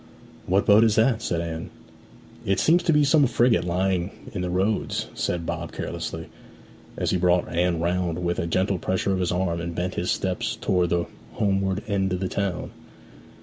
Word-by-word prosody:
'What 95 +2 +2
boat 105 +2 +6
is 110 -2 +3
that?' 115 0 +3
said 85 -5 -1
Anne. 80 -1 -5 0.7
'It 95 -1 +1
seems 170 +3 +4
to 170 - +1
be 150 -1 +4
some 145 -1 +4
frigate 120 -3 +3
lying 90 +1 0 0.2
in 95 - -3
the 90 - -2
Roads,' 95 +4 0
said 85 -1 -2
Bob 85 -1 -4
carelessly, 85 -1 -5 0.7
as - - 0
he 95 - +2
brought 90 0 +2
Anne 85 0 +1
round 85 0 0
with 85 0 0
a 85 - -1
gentle 95 +2 0
pressure 95 +2 0
of 95 - -1
his 90 - 0
arm 90 -2 -1
and 85 0 -5
bent 90 +1 -2
his 90 - -2
steps 95 -2 -1
towards 90 -2 +1
the 85 0 +1 0.3
homeward 95 -1 0
end 95 -3 0
of 90 - -1
the 95 - -1
town. 100 -3 -2
90 Hz, 190 wpm, -25 LUFS, 85-100 Hz, 0.7 s, boat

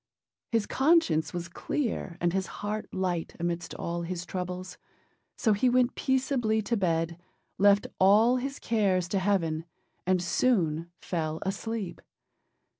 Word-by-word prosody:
His 225 -3 +2
conscience 265 - +3
was 175 -1 -4
clear 190 - -3
and 175 0 +1
his 190 -1 0 0.2
heart 210 +1 -3
light 180 -3 -2
amidst 170 0 -3
all 170 0 -3
his 175 +1 -4
troubles; 180 0 -5 0.6
so 220 -4 +3
he 225 +5 +3
went 250 0 +3
peaceably 260 -4 +1
to 235 - 0
bed, 165 -4 0 0.4
left 200 +1 +5
all 215 +6 +6
his 275 +2 -3
cares 195 -6 +1
to 195 - +1
Heaven, 170 -5 +1 0.4
and 185 -1 +3
soon 170 -4 +1
fell 160 -3 -3
asleep. 200 -1 -4
190 Hz, 130 wpm, -28 LUFS, 170-225 Hz, 0.6 s, all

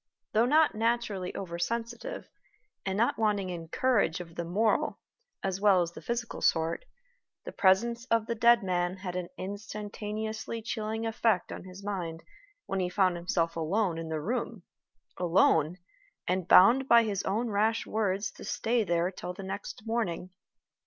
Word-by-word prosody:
Though 225 +3 +4
not 310 +3 +4
naturally 220 -4 -1
over 170 -3 -5
sensitive, 235 - -3 0.6
and 190 0 -1
not 230 +2 +1
wanting 205 -4 +1
in 165 -2 -6
courage 210 -5 +1
of 170 -2 -9
the 170 - -4
moral 205 +6 +1 0.5
as 195 0 -2
well 195 -4 +5
as 170 - -5
the - - -10
physical 235 -1 -3
sort, 165 - +1 0.6
the - - -5
presence 235 +5 +2
of 230 -3 +1
the 235 - -1
dead 235 0 +5
man 180 0 0
had 185 -2 -6
an 180 -1 -3
instantaneously 215 +2 -5
chilling 220 0 -3
effect 220 -4 +1
on - - -7
his 185 +1 -11
mind 175 -5 -4 0.4
when 195 - -2
he 180 -1 0
found 185 -1 +2
himself 170 -1 -1
alone 170 +2 0
in 165 -1 -5
the 160 -1 -2
room 225 +2 -3 0.6
alone, 170 -2 +3 0.5
and 180 -1 0
bound 245 +10 +7
by 235 -2 +7
his 200 -3 -1
own 220 +4 -1
rash 220 +2 +1
words 200 -2 -1
to - - -12
stay 230 0 0
there 175 -1 +1
till 180 -1 -6
the 195 - -7
next 195 +1 -6
morning. 195 -6 -2
200 Hz, 160 wpm, -29 LUFS, 180-225 Hz, 0.6 s, bound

